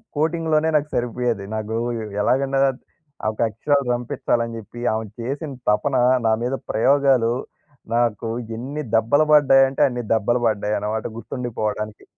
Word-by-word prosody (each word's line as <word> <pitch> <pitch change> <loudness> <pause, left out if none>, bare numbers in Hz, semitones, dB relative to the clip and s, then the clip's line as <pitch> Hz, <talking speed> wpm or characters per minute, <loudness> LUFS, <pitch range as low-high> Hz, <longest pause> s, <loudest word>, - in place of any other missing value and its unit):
కోటింగ్‌లోనే 160 0 +1
నాకు 150 0 +1
సరిపోయేది. 120 -3 -1
నాకు 110 +1 -3 0.5
ఎలాగన్నా 135 +4 +1 0.7
ఒక 110 - -15
అక్షరాలు 140 +4 0
రంపిచ్చాలని 120 -2 -1
జెప్పి, 115 +2 -10
ఆమె 110 0 -2 0.2
చేసిన 140 +5 -4 0.2
తపన 105 +6 +1 0.3
నా 110 - +4
మీద 125 - -1 0.2
ప్రయోగాలు 130 -1 +3 0.6
నాకు 115 -2 0 0.3
ఎన్ని 140 +6 -5
దెబ్బలు 115 +7 +3
పడ్డాయంటే, 135 -2 +5
అన్ని 125 -1 -4
దెబ్బలు 115 +3 +1
పడ్డాయన్నమాట 105 +1 -1
గుర్తుండిపోవడానికి. 110 -4 -4
120 Hz, 115 wpm, -22 LUFS, 110-140 Hz, 0.7 s, పడ్డాయంటే